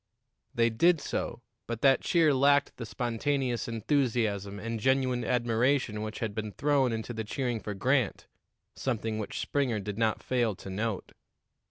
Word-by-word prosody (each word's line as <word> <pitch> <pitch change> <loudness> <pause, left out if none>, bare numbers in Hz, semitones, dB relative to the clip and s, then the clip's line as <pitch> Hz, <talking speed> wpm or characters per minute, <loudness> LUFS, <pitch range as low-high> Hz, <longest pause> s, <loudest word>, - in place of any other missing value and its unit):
They 115 0 +3
did 165 +9 +4
so, 120 - -4 0.2
but 115 -1 -4
that 135 -1 +5
cheer 165 -4 +3
lacked 140 +1 +3
the 115 - -6
spontaneous 125 +1 -1
enthusiasm 115 -5 0
and 115 +2 -4
genuine 130 0 +1
admiration 120 -1 +1
which 110 0 -5
had 110 -3 -2
been 110 -1 -4
thrown 140 -4 +2
into 115 +1 -4
the 110 -1 -3
cheering 120 +1 -2
for 105 -1 -5
Grant, 125 +2 +1 0.5
something 115 -4 -2
which 105 - -5
Springer 130 -6 0
did 105 +1 -5
not 110 -1 +1
fail 120 -5 +1
to 95 - -9
note. 105 +1 -3
115 Hz, 155 wpm, -29 LUFS, 110-130 Hz, 0.5 s, that